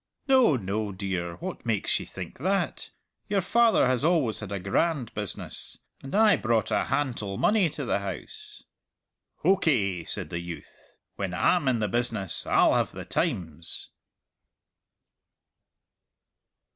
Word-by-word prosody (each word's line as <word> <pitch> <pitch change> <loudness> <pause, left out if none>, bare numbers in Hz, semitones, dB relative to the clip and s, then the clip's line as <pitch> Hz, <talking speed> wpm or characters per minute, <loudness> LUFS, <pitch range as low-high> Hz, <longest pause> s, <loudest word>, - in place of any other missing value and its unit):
"No, 260 - +5
no, 105 -1 -2
dear; 95 -3 -3
what 180 +2 -6
makes 115 -4 0
ye - - -8
think - - -8
that? 190 +6 -1 0.4
Your 205 - +1
father 230 - +4
has 130 0 +1
always 155 -9 +2
had 105 -2 -7
a 100 - -1
grand 120 - 0
business, 105 -3 -6 0.2
and 135 - -6
I 215 -1 +6
brought 115 -3 0
a - - +2
hantle 115 -9 -1
money 205 -5 +3
to - - -5
the - - +1
house." 430 -1 -8 0.8
"Hokey!" 105 - +2
said - - -4
the 85 - -2
youth, 85 -3 -10 0.2
"when 95 -3 -3
Ah'm 165 - +2
in 125 -2 +3
the 105 -1 0
business 105 -4 -2
Ah'll - - +5
have - - +1
the - - -7
times!" 85 - -3
120 Hz, 135 wpm, -27 LUFS, -, 0.8 s, I